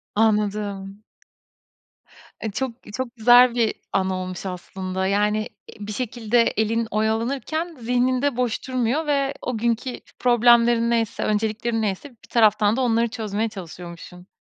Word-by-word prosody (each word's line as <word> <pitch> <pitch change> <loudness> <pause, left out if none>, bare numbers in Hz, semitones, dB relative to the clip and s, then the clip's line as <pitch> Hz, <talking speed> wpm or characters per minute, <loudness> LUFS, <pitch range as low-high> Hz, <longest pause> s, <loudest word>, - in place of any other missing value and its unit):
Anladım. 210 -2 0 1.4
E, 220 - -3
çok 260 +5 -2 0.2
çok 255 -1 -4
güzel 245 +1 +6
bir 230 -2 +2 0.2
anı 190 0 +1
olmuş 185 0 -5
aslında, 185 +1 -4
yani, 210 +2 +2 0.3
eee, - - -13
bir - - -4
şekilde 235 0 0
elin 225 0 0
oyalanırken 255 +10 -1
zihnin 250 +2 +1
de 285 -3 0
boş 250 0 -1
durmuyor 255 +5 0
ve 280 -1 +1
o 250 -2 -3
günkü 235 +2 -1 0.2
problemlerin 235 -1 +4
neyse, 230 -2 0
önceliklerin 220 +2 -1
neyse 205 +7 -3
bir 235 - -22
taraftan 215 -2 +4
da 265 - +1
onları 235 -1 +2
çözmeye 220 -1 -3
çalışıyormuşsun. 180 -2 -10
225 Hz, 135 wpm, -23 LUFS, 210-245 Hz, 1.4 s, güzel